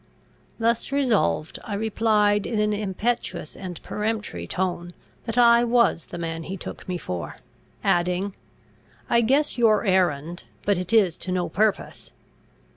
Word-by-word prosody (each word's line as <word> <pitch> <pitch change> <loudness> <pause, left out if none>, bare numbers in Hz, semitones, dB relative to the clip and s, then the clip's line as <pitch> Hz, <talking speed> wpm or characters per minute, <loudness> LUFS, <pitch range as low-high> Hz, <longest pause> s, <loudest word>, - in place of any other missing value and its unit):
Thus 230 +3 0
resolved, 220 - +1
I 205 - -4
replied 210 -1 +2
in 225 - -1
an 210 0 +2
impetuous 205 -4 -2
and 180 -3 -7
peremptory 210 - -3
tone, 175 - -2 0.3
that 225 0 -4
I 235 -1 +6
was 235 -8 +2
the - - -7
man 165 -1 -4
he 190 +4 -6
took 185 - -8
me 180 - -1
for; 85 - -5 0.5
adding, 180 +3 +1 0.8
"I 235 - +5
guess 270 +3 +2
your 225 -1 +4
errand; 175 -3 +1 0.2
but 200 -3 +2
it 180 +3 -5
is 200 -7 +3
to 185 - -4
no 180 -2 -1
purpose. 195 - -1
200 Hz, 140 wpm, -24 LUFS, 175-225 Hz, 0.8 s, I